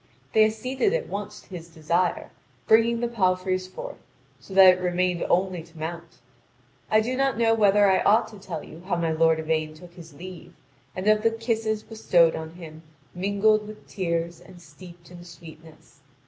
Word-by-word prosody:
They 215 0 +6
acceded 255 - -1
at - - -3
once 200 0 -6
to - - -24
his 170 -3 -9
desire, 170 +2 -1 0.3
bringing 230 +1 +3
the 240 - 0
palfreys 185 -4 0
forth, - - -9 0.4
so - - -17
that 190 -1 +9
it 180 - -6
remained 180 -1 0
only 185 -1 +1
to 165 0 -17
mount. 165 +1 -7 0.7
I 215 0 +4
do 245 +4 -2
not 270 -1 0
know 230 -1 +3
whether 205 -2 +4
I 190 -1 +3
ought 215 +3 +3
to 210 -2 -13
tell - - -6
you 165 - -12
how 190 - 0
my 165 -1 -1
lord 160 0 +3
Yvain 155 -1 -2
took 175 +2 -14
his 165 -4 -13
leave, 180 +2 -11 0.4
and 185 +2 -4
of 215 0 +4
the 225 - +3
kisses 225 -1 -2
bestowed 175 -7 +2
on 160 +1 -7
him, 160 -3 -11 0.3
mingled 205 +3 +1
with 215 0 -12
tears 170 -2 -3
and 185 -2 -15
steeped 170 +2 -15
in 175 -1 -11
sweetness. 160 -2 -15
185 Hz, 180 wpm, -25 LUFS, 170-215 Hz, 0.7 s, that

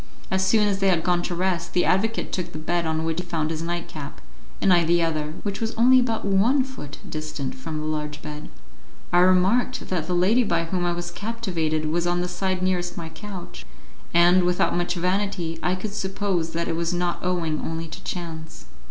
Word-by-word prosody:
As 190 0 +2
soon 210 +2 +4
as 195 -1 0
they 195 - +2
had 175 -4 +3
gone 175 -1 +2
to 175 0 -3
rest, 175 -1 -1
the 180 - +3
advocate 225 +5 +1
took 180 - -3
the - - -5
bed 170 +2 -1
on 160 0 0
which 165 +1 -1
he - - -2
found 160 -2 -1
his 160 -1 -3
nightcap, 165 -4 -5 0.4
and 190 - +4
I 175 -1 +5
the 170 +1 +3
other, 155 -1 -1
which 200 0 -3
was 225 0 -2
only 255 +3 +6
about 230 -4 0
one 215 +8 +3
foot 255 - -8
distant 155 -3 -4
from 255 -12 -5
the 155 - -4
large 150 -1 -3
bed. 150 -1 -7 0.6
I 175 - +6
remarked 190 +8 +3
that 170 -4 -1
the 180 - 0
lady 205 +8 +4
by 170 -6 +1
whom 175 +1 -1
I - - +2
was 175 0 -4
captivated 175 -7 -2
was 170 +3 0
on 175 0 +1
the 180 - -1
side 185 +1 -1
nearest 180 -1 0
my 165 -1 -5
couch, 195 0 -8 0.5
and, 175 +2 +5
without 180 0 +2
much 175 +1 0
vanity, 180 -2 -1
I 180 +3 +1
could 200 +2 -5
suppose 190 -4 -1
that 170 +1 -1
it 165 - -1
was 170 +1 -1
not 175 0 0
owing 170 -4 0
only 165 0 -3
to 155 - -9
chance. 160 - -6
175 Hz, 210 wpm, -24 LUFS, 165-190 Hz, 0.6 s, only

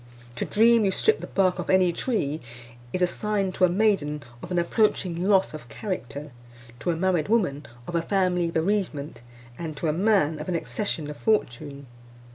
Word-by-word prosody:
To - - -1
dream 230 +1 +4
you 195 - +3
stript 440 - +2
the - - -6
bark 185 -2 +1
off 175 - -4
any 185 -2 +4
tree, 160 - -1 0.5
is 185 - 0
a - - +7
sign 200 +1 -1
to 185 - +3
a - - +2
maiden 175 -7 +1 0.2
of - - -8
an 180 - -1
approaching 175 -1 +1
loss 195 -4 +3
of 155 -5 -8
a - - -20
character; 150 - -5 0.5
to - - -2
a 170 - +2
married 175 -2 +1
woman, 165 -11 +1 0.2
of 175 - -7
a 170 - +2
family 180 -2 +1
bereavement; 165 - -1 0.4
and 160 -3 -5
to 165 - -3
a 155 - +2
man, 175 -5 +2
of 155 - -5
an 180 - 0
accession 170 -3 -2
of 150 - -7
fortune. 140 - -1
180 Hz, 190 wpm, -25 LUFS, 155-200 Hz, 0.5 s, a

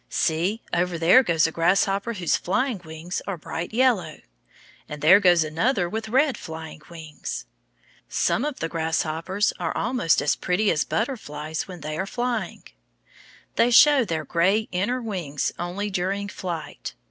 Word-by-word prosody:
See, 180 +8 0
over 175 0 0
there 170 +10 +6
goes 170 -9 +2
a 160 - 0
grasshopper 195 +6 +1
whose 180 -6 0
flying 220 +2 -1
wings 160 +2 -6
are 195 -3 -3
bright 165 +2 -5
yellow. 220 - +1 0.7
And 150 - -6
there 160 +7 +7
goes 175 -4 +5
another 175 - 0
with 220 +4 -4
red 265 +3 +2
flying 160 -1 -8
wings. 160 - -7 0.6
Some 240 - +1
of 295 -2 -4
the 165 - 0
grasshoppers 165 +4 -1
are 165 -2 -2
almost 235 -10 +1
as 145 - +1
pretty 195 +3 +1
as 150 - 0
butterflies 160 - -3
when 180 -3 -9
they 155 +1 -4
are 190 - -2
flying. 240 -5 -3 0.9
They 240 - +4
show 280 +2 +7
their 160 -7 -3
gay 190 +8 +2
inner 235 +8 -1
wings 175 -10 -2
only 185 +4 -3
during 195 +2 -2
flight. 170 -6 -6
180 Hz, 150 wpm, -24 LUFS, 160-215 Hz, 0.9 s, there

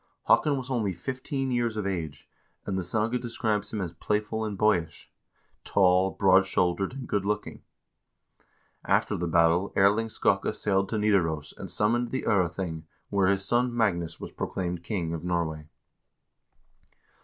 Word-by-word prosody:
Haakon 145 -2 +3
was 130 0 -5
only 110 -7 0
fifteen 130 - -3
years 120 -3 0
of 105 - -2
age, 80 -7 -4 0.4
and 100 - -2
the 95 - 0
saga 110 +7 0
describes 110 -4 -2
him 110 - -3
as 85 -3 -4
playful 105 +5 -2
and 105 -2 -4
boyish; 85 - 0 0.5
tall, 95 -1 +3
broad 95 0 +4
shouldered, 90 +3 0
and 135 -2 -7
good 100 -2 0
looking. 105 +1 -3 1.2
After - - +1
the 85 - -2
battle 85 +3 +3
Erling 100 +3 +3
Skakke - - +1
sailed 95 -1 0
to 110 - -1
Nidaros 85 -8 +1
and - - -8
summoned 120 +3 +1
the 130 - -3
0rething, 90 -4 -1 0.3
where 100 -2 +3
his 100 0 +1
son 120 +2 +1
Magnus 85 -7 0
was - - -7
proclaimed 90 -2 -3
king 85 -3 -2
of 80 - -5
Norway. 80 -3 -2
100 Hz, 150 wpm, -27 LUFS, 85-110 Hz, 1.2 s, broad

